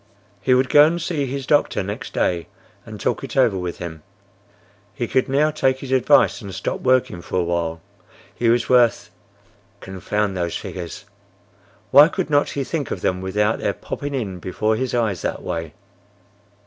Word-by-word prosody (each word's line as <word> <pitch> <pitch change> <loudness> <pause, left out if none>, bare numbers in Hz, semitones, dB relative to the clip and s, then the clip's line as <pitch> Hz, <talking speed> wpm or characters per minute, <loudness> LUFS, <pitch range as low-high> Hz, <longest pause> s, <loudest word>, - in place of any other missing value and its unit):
He 130 - +3
would 130 +1 +2
go 145 - +8
and 165 +3 +2
see 155 -5 -2
his 135 +1 -4
doctor 145 -8 +2
next 100 +2 -6
day 85 -2 -1 0.4
and - - -8
talk - - -1
it - - -6
over - - +4
with 90 -2 -4
him. 80 -3 -7 0.9
He - - -2
could 130 0 +1
now 150 +3 +2
take 130 -3 +1
his 135 -1 -8
advice 130 -2 +4
and 100 -2 -8
stop - - -3
working 130 -9 +1
for 90 - -2
a - - +1
while; 85 -1 -2 0.5
he 120 - 0
was 120 0 +2
worth—Confound 105 -4 -2
those 85 -2 -2
figures! 85 -3 -7 0.9
Why 145 +2 +9
could 155 - -3
not 145 0 +3
he 140 - -3
think 145 -1 -3
of 90 - -4
them 90 0 0
without 105 +3 0
their 100 - -1
popping 145 +6 -5
in 100 -8 -4
before 110 +5 -1
his 125 +2 -2
eyes 110 -7 0
that - - -3
way! 80 -3 -4
110 Hz, 175 wpm, -21 LUFS, 90-135 Hz, 0.9 s, Why